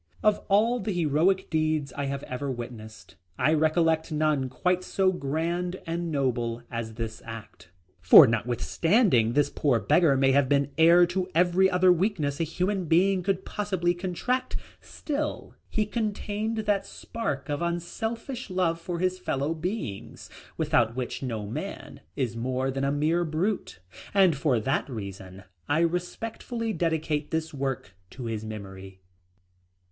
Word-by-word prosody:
Of 215 -1 +3
all 225 +5 +3
the 210 0 -2
heroic 175 +3 +1
deeds 155 -4 0
I 145 - -3
have 140 0 -3
ever 130 +2 -4
witnessed, 120 -3 -8 0.2
I 155 - +3
recollect 160 +1 +2
none 150 -4 +1
quite 180 +8 0
so 190 0 +1
grand 175 +3 -2
and 170 0 -3
noble 120 -4 -1
as 115 -2 -4
this 115 -1 -5
act, 115 -4 -10 0.3
for 90 - +10
notwithstanding 120 - +2
this 145 +1 +2
poor 135 -6 +1
beggar 150 +1 +3
may 135 0 +4
have 135 -1 +3
been 140 0 +2
heir 170 +2 +7
to 180 +1 -2
every 180 +2 +4
other 180 0 +4
weakness 165 -6 -1
a - - +2
human 180 +4 -1
being 185 +4 +3
could 190 +1 -1
possibly 190 -4 -1
contract, 190 +9 -2 0.3
still 300 0 -4 0.2
he 215 - 0
contained 215 0 -2
that 200 -2 +1
spark 145 -12 -4
of 145 0 -2
unselfish 220 +9 -3
love 175 -3 0
for 175 0 -4
his 185 +1 0
fellow 145 -3 -1
beings, 140 - -5 0.3
without 135 -8 +2
which 125 -1 -4
no 115 -6 -3
man 105 - -6
is 120 -4 -2
more 130 +3 -1
than 135 +1 -3
a 140 - +1
mere 155 +4 +1
brute, 170 +6 -2 0.4
and 190 -5 +5
for 135 -4 +1
that 135 +5 -1
reason 100 -4 -8 0.3
I 150 +3 +3
respectfully 220 +7 -2
dedicate 160 -4 -1
this 160 0 -2
work 135 -8 -3 0.2
to 125 +4 -8
his 110 -2 -3
memory. 95 -3 -8
160 Hz, 145 wpm, -27 LUFS, 130-185 Hz, 0.4 s, for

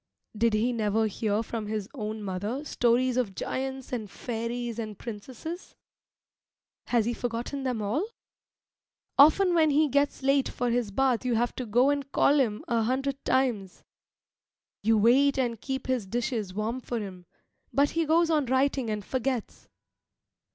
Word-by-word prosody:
Did 225 0 +2
he 235 +4 +1
never 220 -1 +1
hear 215 +1 -1
from 225 -2 -5
his 210 -2 -3
own 215 0 -5
mother 205 +9 -3
stories 250 -1 +2
of 215 -7 -1
giants 265 +3 -4
and 220 -4 -3
fairies 235 +1 -4
and 215 -3 -5
princesses? 255 - -8 1.1
Has 235 -3 +2
he 240 - 0
forgotten 240 +4 -3
them 250 -5 -2
all? 290 - -1 1.1
Often 350 +6 +6
when 320 -2 +4
he 300 +2 +4
gets 285 0 +1
late 275 0 +3
for 245 -1 -1
his 240 -3 0
bath 255 +3 +1
you 250 -2 +1
have 240 +2 +1
to 255 - -5
go 245 +6 +4
and 280 -1 -3
call 290 +1 +4
him 220 -6 0
an 230 -2 +1
hundred 270 +3 -1
times. 240 -8 0 1.0
You 220 +2 +3
wait 270 +6 +4
and 235 -4 -1
keep 265 -1 -3
his 250 -6 -1
dishes 235 -2 -2
warm 215 +6 -2
for 240 - -4
him, 185 -4 -8 0.4
but 285 +1 +3
he 330 -1 0
goes 330 +1 +3
on 300 -4 +2
writing 260 -1 +1
and 210 -2 -3
forgets. 260 -3 -3
245 Hz, 160 wpm, -28 LUFS, 220-270 Hz, 1.1 s, Often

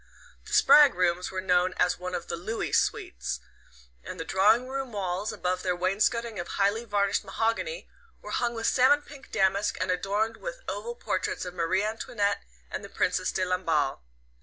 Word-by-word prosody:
The - - -8
Spragg 295 -7 +7
rooms 180 0 +1
were 185 -1 -3
known 180 0 +2
as 180 - +2
one 180 0 -4
of 170 - -4
the 170 - -4
Looey 200 +7 -3
suites, - - 0 0.6
and - - -8
the 165 - -4
drawing 210 +8 +3
room 265 -2 -4
walls, 195 +1 -2
above 185 -3 -2
their 180 -1 0
wainscoting 210 +4 0
of 175 - -4
highly 205 +4 0
varnished 205 -1 +1
mahogany, 225 - -2 0.3
were - - -9
hung 240 -1 0
with 225 0 -3
salmon 280 +3 +4
pink 280 -2 -14
damask 195 +1 +1
and - - 0
adorned 205 +5 -1
with - - -7
oval 475 0 -4
portraits 475 - -2
of 180 - -6
Marie 180 +3 +1
Antoinette 205 -2 -1 0.3
and - - -4
the - - -9
Princess - - 0
de 185 - 0
Lamballe. 165 -6 0
200 Hz, 175 wpm, -28 LUFS, 180-230 Hz, 0.6 s, Spragg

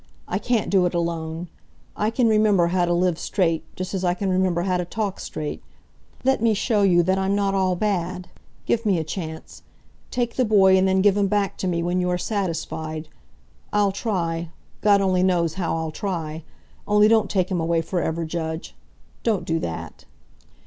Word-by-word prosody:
I - - -1
can't 240 -4 0
do 185 -2 +4
it 175 - -4
alone. 165 0 -2 0.5
I 210 - 0
can 230 +1 +2
remember 210 -5 +4
how 180 0 +2
to 175 - -1
live 175 -1 +1
straight, 165 -4 0
just 185 +1 -5
as 190 -1 -2
I 175 -1 +2
can 190 0 -1
remember 185 -2 +1
how 185 -1 +1
to 180 - -1
talk 200 +2 -3
straight. 150 -1 -5 0.6
Let 265 -2 +2
me 225 -2 +3
show 210 0 +1
you 175 -3 +4
that 190 +2 +1
I'm 190 +1 +1
not 200 -1 +1
all 190 -2 +1
bad. 185 -2 -2 0.4
Give 230 - +1
me 200 -5 +2
a 160 - -1
chance. 160 -1 -7 0.5
Take 240 -2 -2
the 255 - +4
boy 195 -4 +5
and 190 0 +3
then 190 0 +2
give 205 -1 +5
him 200 -1 +2
back 200 -1 0
to 190 - -1
me 170 -2 0
when 175 +1 0
you 180 - 0
are 180 - +1
satisfied. 160 -5 -3 0.6
I'll 205 -1 +2
try 170 -5 -2 0.3
God 205 -1 +5
only 185 -2 +2
knows 175 -3 +2
how 175 -2 -2
I'll 160 -1 -3
try. 160 -3 -4 0.5
Only 210 0 +5
don't 220 -2 +3
take 185 -1 0
him 175 -3 0
away 165 0 +1
forever, 165 -1 -2
Judge! 160 0 -4 0.5
Don't 220 -5 0
do 165 0 0
that!" 85 - -6
185 Hz, 190 wpm, -23 LUFS, 170-200 Hz, 0.6 s, boy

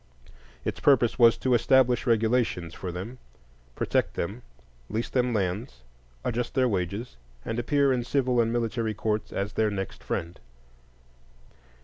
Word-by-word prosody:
Its - - -2
purpose 125 -4 +3
was 115 -1 +7
to 130 - +1
"establish 125 0 +3
regulations" 110 -7 +1
for 90 - -5
them, 100 +9 -7 0.6
protect - - 0
them, 100 +8 -3 0.5
lease 115 +2 -2
them 125 -1 +1
lands, 95 - -2 0.4
adjust 120 0 -2
their 130 -1 +3
wages, 100 - -3 0.3
and 115 +1 -2
appear 140 +2 +2
in 125 -1 0
civil 125 -1 +2
and 115 0 0
military 115 -2 -1
courts 105 0 -2
as 100 +1 -3
their 110 -1 +2
"next 95 -2 -5
friend." 85 +1 -4
115 Hz, 135 wpm, -27 LUFS, 100-125 Hz, 0.6 s, was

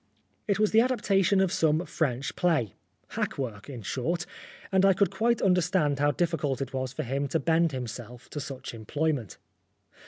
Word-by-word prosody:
It 200 -3 +2
was 215 0 +2
the 220 - +6
adaptation 205 -6 +2
of 190 -2 +2
some 160 -1 +2
French 135 -4 -2
play 160 - +1 0.4
hack - - -3
work, 115 -4 -5
in 125 -5 -7
short; 165 - -2 0.5
and 190 0 +3
I 195 0 +6
could 200 +2 +2
quite 235 +1 +1
understand 180 -6 +2
how 145 +1 +3
difficult 145 -3 0
it 135 -1 -4
was 130 -1 -2
for 155 - -4
him 140 +2 -1
to 160 +4 0
bend 165 0 +2
himself 120 -2 -7
to 150 - -4
such 135 -4 -6
employment. 130 - -2
155 Hz, 175 wpm, -28 LUFS, 130-180 Hz, 0.5 s, the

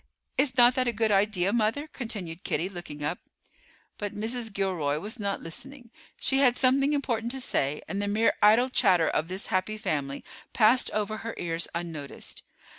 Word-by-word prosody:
Is 265 -2 +2
not 245 0 +7
that 255 0 0
a - - +3
good 220 0 +1
idea, 200 -1 +2
mother?" 235 +6 +1
continued 205 - -6
Kitty, 175 - -1
looking 165 -6 -8
up. 150 +4 -1 0.8
But 205 -1 -4
Mrs. 225 +2 -3
Gilroy 180 -8 -1
was 210 +9 -5
not 200 -1 -2
listening. 245 +8 -7 0.3
She 270 - +1
had 250 -3 +4
something 275 +2 +3
important 240 -5 -1
to 265 - -4
say, 145 - -1
and 200 0 -3
the 205 - -1
mere 215 +3 +3
idle 225 +5 +6
chatter 185 -10 +3
of 155 - 0
this 185 +2 -4
happy 190 +3 0
family 140 -8 -2 0.3
passed 230 +3 +4
over 215 +1 -2
her 230 +1 -6
ears 165 -1 -2
unnoticed. 160 -5 -6
210 Hz, 175 wpm, -27 LUFS, 175-245 Hz, 0.8 s, not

